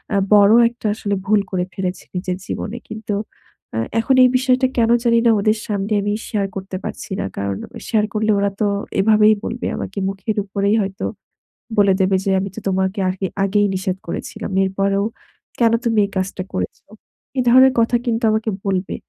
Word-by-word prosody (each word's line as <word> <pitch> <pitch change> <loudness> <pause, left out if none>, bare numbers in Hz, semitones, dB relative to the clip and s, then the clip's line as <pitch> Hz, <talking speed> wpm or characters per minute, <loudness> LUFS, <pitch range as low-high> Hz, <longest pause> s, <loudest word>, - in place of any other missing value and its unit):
আ - - +3 0.2
বড় 205 +1 +6 0.2
একটা 235 -2 -6
আসলে 200 -2 -2
ভুল 210 +1 +3
করে 180 -1 0
ফেলেছি 185 -1 -4
নিজের 180 0 -2
জীবনে। 225 +3 -4
কিন্তু 215 -2 -4 0.6
আ - - 0 0.2
এখন 260 +4 +2
এই 250 - +6
বিষয়টা 255 0 +2
কেন 230 -1 +3
জানি 235 -1 +4
না - - +6
ওদের 215 +1 +2
সামনে 205 0 -2
আমি 205 +1 -1
শেয়ার 200 -3 -1
করতে 190 -1 -5
পারছি - - -7
না। - - -1
কারণ, 100 -1 -2 0.3
শেয়ার 215 -2 +2
করলে 215 0 +1
ওরা 200 0 +2
তো 210 - +3 0.3
এভাবেই 215 +1 +5
বলবে 235 +2 -3
আমাকে 195 - -6
মুখের 195 +3 -4
উপরেই 200 +2 0
হয়তো 195 0 -4 0.7
বলে 200 -1 +5
দেবে 190 0 +3
যে, 195 - 0
"আমি 195 0 -4
তো - - -5
তোমাকে 190 +2 0
আগে 190 +1 -3 0.2
আগেই 205 +1 +2
নিষেধ 185 0 -2
করেছিলাম। 215 -1 -5
এরপরেও 195 +1 0 0.6
কেন 230 -1 +4
তুমি 225 -2 +1
এই - - -14
কাজটা 190 0 -2
করেছ?" 90 0 -3 0.6
এ - - +4
ধরনের 260 +2 +7
কথা 235 +1 +3
কিন্তু 230 0 0
আমাকে 220 0 0 0.2
বলবে। 190 -1 -1
205 Hz, 180 wpm, -20 LUFS, 190-220 Hz, 0.7 s, ধরনের